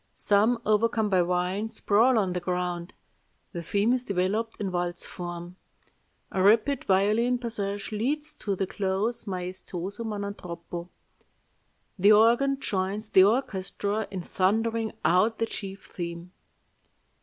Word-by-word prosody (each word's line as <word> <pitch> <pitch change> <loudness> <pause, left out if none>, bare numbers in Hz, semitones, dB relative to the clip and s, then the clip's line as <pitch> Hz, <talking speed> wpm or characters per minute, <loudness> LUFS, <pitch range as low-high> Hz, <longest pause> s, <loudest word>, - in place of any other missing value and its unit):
Some, 215 +4 +3
overcome 215 0 +2
by 185 -1 +4
wine, 180 +4 -1
sprawl 225 +4 +3
on 190 -4 +1
the 180 - -1
ground. 180 0 -3 0.6
The 170 - -5
theme 205 +7 +1
is 255 -1 0
developed 205 +3 -1
in 195 -2 -2
waltz 175 0 -1
form. 175 0 -7 0.7
A 190 - 0
rapid 225 +7 +3
violin 215 +6 +3
passage 205 -4 -4
leads 295 +8 -1
to 205 -8 -3
the 195 - -1
close, 195 +4 -2
maestoso 185 +2 -5
ma 215 -2 -3
non 200 0 -3
troppo. 175 -1 -8 1.1
The 205 +3 +7
organ 240 +6 +4
joins 200 0 -2
the 190 - +7
orchestra 205 -2 -1
in 190 -3 -5
thundering 225 +5 0
out 200 +6 +3
the 225 - +1
chief 195 -3 -7
theme." 170 0 -6
200 Hz, 130 wpm, -27 LUFS, 180-225 Hz, 1.1 s, The